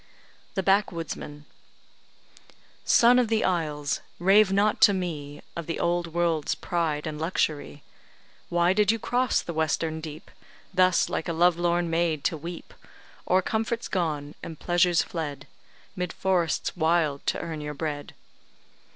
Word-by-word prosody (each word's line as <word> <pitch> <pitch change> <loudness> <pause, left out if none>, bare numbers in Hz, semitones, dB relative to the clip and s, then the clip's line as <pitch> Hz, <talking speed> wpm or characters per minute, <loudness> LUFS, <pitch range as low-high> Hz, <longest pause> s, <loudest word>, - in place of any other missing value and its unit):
THE 190 - 0
BACKWOODSMAN 165 -6 -1 1.4
Son 245 +2 +5
of 245 - +2
the 220 0 +1
isles! 150 -5 -1 0.2
rave 195 +3 +5
not 205 +2 +2
to 200 - +7
me 155 -6 -4
Of 170 -2 -5
the 165 - -3
old 175 0 0
world's 165 -2 0
pride 160 -4 -2
and 155 -1 -5
luxury; 155 -3 -2 0.7
Why 175 +1 +3
did 210 +1 +3
you 225 - -1
cross 250 +3 0
the 170 - -5
western 160 0 -1
deep, 155 0 -9 0.4
Thus 185 -1 +4
like - - -3
a 170 - -1
love 175 +1 +4
lorn 175 0 +1
maid 165 -3 0
to - - +1
weep 170 +3 -8 0.6
O'er 185 +1 +4
comforts 230 +3 -2
gone 150 -5 -2
and 160 - -8
pleasures 175 -1 +3
fled, 145 -4 -5 0.5
'Mid 180 -1 -3
forests 180 -4 0
wild 160 -4 +1
to - - +1
earn 160 -2 -5
your 150 0 -5
bread? 145 -1 -5
170 Hz, 140 wpm, -26 LUFS, 155-185 Hz, 1.4 s, to